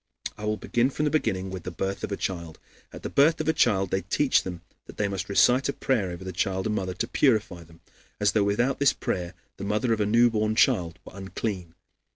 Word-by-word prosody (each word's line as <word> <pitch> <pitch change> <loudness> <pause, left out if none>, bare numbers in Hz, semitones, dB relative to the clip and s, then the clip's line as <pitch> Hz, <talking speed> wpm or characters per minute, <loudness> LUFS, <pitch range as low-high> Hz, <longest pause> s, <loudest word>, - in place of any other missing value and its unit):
I 105 - -7
will 105 0 0
begin 120 +4 +1
from 150 +2 -2
the 150 - +1
beginning 95 -11 -1
with 95 -2 -5
the 90 - -6
birth 95 +3 -4
of - - -3
a 100 - -2
child. 85 -4 -4 0.3
At - - -11
the - - -3
birth 150 +4 +4
of 155 - -3
a 160 - +3
child 95 - +2
they 95 - +1
teach 130 +10 +2
them 90 -2 -7 0.3
that - - -12
they 105 - +1
must 100 0 -4
recite 125 +7 +4
a - - 0
prayer 110 -8 0
over 90 +1 -7
the 95 - -5
child 95 +1 -1
and 110 - 0
mother 95 -3 -2
to - - -2
purify 110 - +1
them, 80 0 -19 0.4
as 105 -2 +3
though 105 0 +2
without 120 +7 +1
this 140 -1 +4
prayer 90 0 -3 0.2
the - - -7
mother 105 +4 +1
of 110 - -1
a 105 - +1
newborn 110 -1 +3
child 90 -9 +2
were - - -12
unclean. 95 -3 -5
100 Hz, 235 wpm, -26 LUFS, 95-115 Hz, 0.4 s, birth